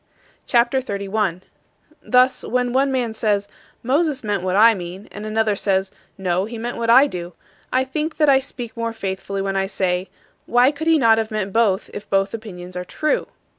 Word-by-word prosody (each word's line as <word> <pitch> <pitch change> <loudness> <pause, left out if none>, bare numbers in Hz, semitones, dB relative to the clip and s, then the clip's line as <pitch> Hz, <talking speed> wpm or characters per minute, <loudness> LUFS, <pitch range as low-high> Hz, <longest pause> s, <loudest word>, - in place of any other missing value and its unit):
CHAPTER 240 +2 +3
XXXI 200 -5 -5
42. 195 -5 0 0.6
Thus, 255 0 +3
when 250 0 -1
one 270 +1 +2
man 245 -4 -1
says, 205 -2 0 0.4
"Moses 280 +2 +1
meant 205 -3 -1
what 185 0 -1
I 225 +3 +7
mean," 185 +1 -7
and 210 +1 -7
another 215 -1 +1
says, 190 -1 0 0.3
"No, 185 0 0
he 230 +2 -7
meant 240 +2 -4
what 230 0 -2
I 260 +4 +8
do," 175 -9 -6 0.4
I 255 +1 +2
think 305 +4 -3
that 300 - +3
I 270 -1 +6
speak 250 -3 -7
more 230 -1 -3
faithfully 195 -1 -4
when 195 0 -2
I 195 0 0
say, 185 -1 -1 0.4
"Why 245 +3 +4
could 310 +2 -5
he 325 -1 +5
not 225 -5 +4
have 220 -1 -2
meant 205 -3 -3
both 215 -4 +1
if 205 - -8
both 195 0 +1
opinions 185 -5 -8
are 180 - -3
true?" 305 +11 -1
220 Hz, 195 wpm, -21 LUFS, 195-250 Hz, 0.6 s, I